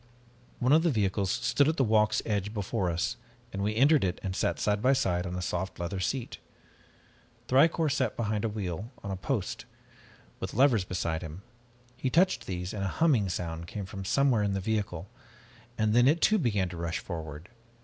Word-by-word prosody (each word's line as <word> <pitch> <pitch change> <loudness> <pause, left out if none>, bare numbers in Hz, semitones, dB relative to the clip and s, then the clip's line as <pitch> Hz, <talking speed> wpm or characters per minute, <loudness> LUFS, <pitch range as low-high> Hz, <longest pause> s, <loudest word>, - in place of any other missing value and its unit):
"One 125 +2 +1
of 160 - +6
the 170 - +2
vehicles 100 - 0
stood 120 +6 +2
at 160 - +1
the 135 - +3
walk's 110 -2 +3
edge 105 0 -2
before 100 -2 -1
us, 85 +8 -1 0.4
and 100 - -3
we 105 +2 0
entered 140 +4 +5
it 90 -1 -1
and 95 -1 -3
sat - - 0
side 105 0 +1
by 130 +3 +4
side 90 -9 0
on 90 - -4
a 90 - -3
soft 90 +2 -3
leather 85 +2 -3
seat. 120 +7 -3 1.1
Thicourt 155 +3 +4
sat 130 -4 0
behind 105 -2 -1
a 115 - +1
wheel 105 +1 -4
on 100 - -4
a - - -2
post, 95 +1 -3 0.7
with - - -5
levers 120 -6 +4
beside 85 -2 -2
him. 80 +3 -8 0.5
He 130 - -2
touched 180 +7 +2
these 90 -1 -4
and 100 -2 -3
a - - 0
humming 135 - +3
sound 85 -1 -4
came 100 0 -5
from 95 0 -7
somewhere 130 +2 +2
in 100 -1 0
the 95 - -1
vehicle 100 -4 -2 0.7
and 110 -1 +2
then 120 +2 +5
it 155 +4 +4
too 215 +4 +4
began 105 - +1
to 85 - -8
rush 85 0 -2
forward. 80 0 -7
105 Hz, 195 wpm, -29 LUFS, 90-125 Hz, 1.1 s, of